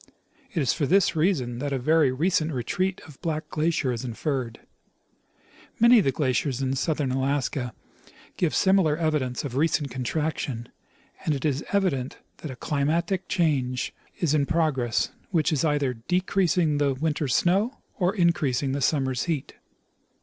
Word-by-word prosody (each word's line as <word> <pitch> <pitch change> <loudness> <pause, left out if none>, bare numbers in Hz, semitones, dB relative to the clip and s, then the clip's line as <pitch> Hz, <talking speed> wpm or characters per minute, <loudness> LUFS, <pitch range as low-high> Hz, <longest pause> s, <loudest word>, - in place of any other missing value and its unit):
It 175 - -2
is 130 - +2
for 145 -4 -1
this 195 +2 +3
reason 145 -8 0
that 145 +1 -3
a 135 - 0
very 150 +1 +3
recent 160 +3 +1
retreat 180 +9 -1
of 150 -4 -15
Black 155 -1 -2
glacier 155 -4 0
is 120 0 -4
inferred. 125 -1 -3 1.2
Many 235 +1 +7
of 200 - +1
the 135 - +3
glaciers 130 -1 0
in 135 -1 0
southern 145 -1 0
Alaska 130 -1 -1 0.6
give 170 -4 0
similar 190 -6 +3
evidence 150 -7 -1
of 135 -4 -5
recent 145 -1 +1
contraction, 130 -2 -3 0.5
and 155 - +1
it 135 - -4
is 145 -1 0
evident 175 -11 0 0.2
that 155 - -7
a 130 - -6
climatic 170 +8 -1
change 135 -9 0 0.3
is 170 -6 +1
in 145 -2 +2
progress 150 -8 +1 0.2
which 165 -3 +1
is 150 - +1
either 145 -4 +1
decreasing 175 +3 +1
the 140 -2 +2
winter's 150 -2 0
snow 205 +10 +2 0.2
or 185 +2 +1
increasing 145 - +1
the 140 +1 -2
summer's 130 -3 +1
heat. 160 -6 -3
150 Hz, 150 wpm, -26 LUFS, 130-170 Hz, 1.2 s, Many